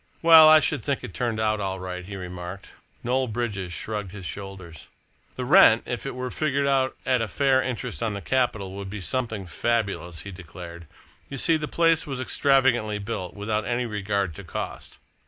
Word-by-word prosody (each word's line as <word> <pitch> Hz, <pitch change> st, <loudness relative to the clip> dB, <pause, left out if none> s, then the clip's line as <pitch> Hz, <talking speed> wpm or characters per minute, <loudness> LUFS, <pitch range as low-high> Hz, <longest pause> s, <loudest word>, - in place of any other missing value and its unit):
"Well, 160 Hz, -1 st, +9 dB
I 155 Hz, 0 st, +9 dB
should 145 Hz, -5 st, -1 dB
think 140 Hz, -2 st, -1 dB
it's -, -, -8 dB
turned 120 Hz, -3 st, -1 dB
out 110 Hz, -1 st, +1 dB
all 95 Hz, -1 st, -3 dB
right," 90 Hz, 0 st, -6 dB
he 100 Hz, +2 st, -8 dB
remarked. 90 Hz, 0 st, -7 dB, 0.3 s
Noel 130 Hz, +2 st, +1 dB
Bridges 105 Hz, -6 st, -3 dB
shrugged 105 Hz, 0 st, -4 dB
his 100 Hz, -3 st, -8 dB
shoulders. 95 Hz, -5 st, -8 dB, 0.5 s
"The -, -, -4 dB
rent, -, -, +7 dB
if -, -, -4 dB
it -, -, -5 dB
were 125 Hz, 0 st, -4 dB
figured 140 Hz, -2 st, 0 dB
out 135 Hz, -1 st, +1 dB
at 125 Hz, -2 st, +2 dB
a 115 Hz, -, -1 dB
fair 135 Hz, +4 st, +2 dB
interest 125 Hz, -2 st, -4 dB
on 110 Hz, -3 st, -1 dB
the -, -, -4 dB
capital, 110 Hz, -4 st, 0 dB
would 100 Hz, 0 st, -7 dB
be 105 Hz, +2 st, -6 dB
something 110 Hz, -1 st, -2 dB
fabulous," 100 Hz, -4 st, -2 dB
he 100 Hz, -, -8 dB
declared. 85 Hz, -1 st, -10 dB, 0.4 s
"You 140 Hz, -, -6 dB
see, 165 Hz, +5 st, +3 dB
the 155 Hz, -1 st, -2 dB
place 165 Hz, -1 st, +2 dB
was 135 Hz, -3 st, -4 dB
extravagantly 130 Hz, -5 st, +2 dB
built 105 Hz, -3 st, -5 dB
without 105 Hz, +1 st, -2 dB
any 120 Hz, +2 st, -1 dB
regard 100 Hz, -4 st, -2 dB
to 100 Hz, -, -8 dB
cost. 85 Hz, -, -6 dB
110 Hz, 190 wpm, -25 LUFS, 95-130 Hz, 0.5 s, Well